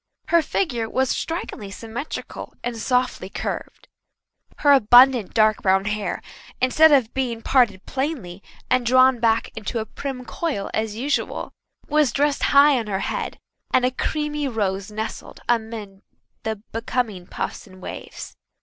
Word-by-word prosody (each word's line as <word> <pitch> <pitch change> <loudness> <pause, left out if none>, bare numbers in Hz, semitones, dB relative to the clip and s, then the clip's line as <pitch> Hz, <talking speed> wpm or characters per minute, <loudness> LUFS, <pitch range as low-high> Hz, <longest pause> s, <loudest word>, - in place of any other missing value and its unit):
Her 340 -1 +5
figure 245 - -1
was 260 0 +1
strikingly 325 - -4
symmetrical 225 +8 -7
and 240 -1 -3
softly 250 -4 0
curved. - - -5 0.7
Her 290 - +4
abundant, 245 -3 +6
dark 215 -1 +4
brown 190 0 +3
hair, 210 0 -2 0.4
instead 305 +5 +5
of 260 -6 +3
being 240 -4 -2
parted 225 -8 +2
plainly 260 - -3 0.3
and 255 -1 +2
drawn 255 +1 +5
back 225 -1 +2
into 220 +1 -4
a 220 - -2
prim 250 +2 -6
coil 280 -13 -3
as 220 -1 -1
usual, 275 +6 -2 0.4
was 300 -3 +3
dressed 290 0 +1
high 280 -1 +6
on 225 - -5
her 195 -1 -2
head, - - -4 0.3
and 250 - +3
a 255 - +2
creamy 300 +2 -2
rose 200 -4 -2
nestled 215 +1 -6
amid 220 -4 -2 0.4
the 220 0 -2 0.2
becoming 225 -5 -2
puffs - - -5
and 185 -1 -15
waves. - - -8
235 Hz, 140 wpm, -23 LUFS, 215-270 Hz, 0.7 s, abundant